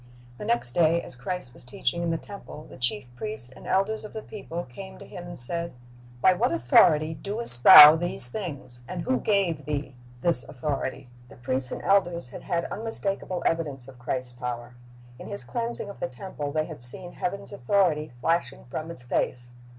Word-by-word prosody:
The - - -6
next 120 +1 +1
day, 165 +3 +3
as - - -9
Christ 125 +1 -5
was - - -11
teaching 125 +6 -2
in 170 - -1
the 165 - 0
temple, 180 -5 -10
the - - -13
chief 125 -3 -1
priests 215 - -5
and - - -13
elders 205 +4 0
of 215 - -10
the 220 - -6
people 175 -5 -6
came 190 +10 -11
to - - -12
Him 175 -1 -9
and 175 - -8
said, 170 +7 +2 0.5
"By 185 - +6
what 180 - +1
authority 155 +6 +4
doest 200 - 0
Thou 150 +1 +12
these 175 -6 +3
things? 140 - -4
and 180 -2 -5
who 260 0 0
gave 180 -8 0
Thee 145 -2 -3 0.3
this 165 -4 +3
authority?" 135 -1 -4 0.2
The - - -14
priests 130 +1 -2
and - - -6
elders 175 -8 +2
had - - -9
had 170 -1 -2
unmistakable 195 -4 -3
evidence 145 -6 -1
of 130 -2 -14
Christ's 125 0 -3
power. 120 -1 -6 0.5
In - - -9
His 200 - +2
cleansing 235 -3 -4
of 200 - -10
the - - -2
temple 145 0 -6
they 155 +1 0
had 155 -6 -9
seen 175 +9 +2
Heaven's 200 +2 -3
authority 155 0 +1
flashing 165 -5 -1
from 160 +1 -5
His 145 -7 -9
face. 120 0 -2
160 Hz, 190 wpm, -26 LUFS, 125-185 Hz, 0.5 s, Thou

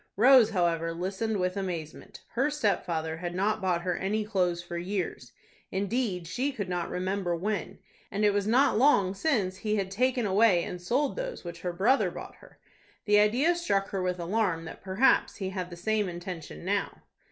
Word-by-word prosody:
Rose, 245 0 +7
however, 165 -4 0
listened 195 +4 -2
with 180 +1 0
amazement. 175 -6 -5
Her 265 +5 +1
stepfather 175 - -1
had 175 +1 -5
not 210 +3 0
bought 180 -2 0
her 180 -1 0
any 210 +3 -1
clothes 180 -4 0
for 175 0 -7
years,—indeed, 190 - -4
she 250 - -1
could 205 -7 -4
not 175 -1 -2
remember 185 -1 -1
when,—and 205 +2 -4
it 205 - +4
was 205 0 0
not 250 0 +4
long 205 -9 +4
since 200 -7 0
he 215 +2 -1
had 195 -2 -2
taken 250 +3 +1
away 195 -3 +4
and 180 - -6
sold 260 +10 0
those - - -5
which 170 -1 -8
her 180 - -2
brother 210 +10 +2
bought - - -9
her. - - -18 0.5
The 210 -1 +5
idea 245 +11 +3
struck 200 - 0
her 195 - -2
with 180 0 -1
alarm 175 -2 0
that - - -9
perhaps 195 +7 +2
he 190 -2 -4
had 185 -2 -4
the 175 - -8
same 210 +2 0
intention 175 -1 -7
now. 200 +1 -2
195 Hz, 175 wpm, -28 LUFS, 175-220 Hz, 0.5 s, Rose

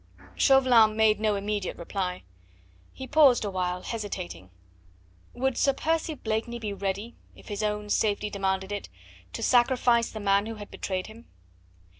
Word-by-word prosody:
Chauvelin 245 -5 +5
made 220 -1 +4
no 215 -1 +1
immediate 200 -1 -3
reply. 180 +1 -4 0.7
He 265 - -8
paused 275 -6 +5
awhile, 180 -2 -2
hesitating. 95 - -6 0.8
Would 265 +1 -1
Sir 275 - +3
Percy 320 +2 -1
Blakeney 225 0 -3
be 215 -3 -4
ready 200 +4 -3 0.2
if - - -15
his 205 0 -3
own 210 0 -2
safety 210 -1 0
demanded 190 0 -2
it 205 -1 -5 0.4
to - - -5
sacrifice 240 -1 +3
the 220 - -7
man 200 0 +2
who 225 - -5
had 205 -1 -10
betrayed 185 -1 -3
him? 225 +2 -13
215 Hz, 145 wpm, -27 LUFS, 200-235 Hz, 0.8 s, Chauvelin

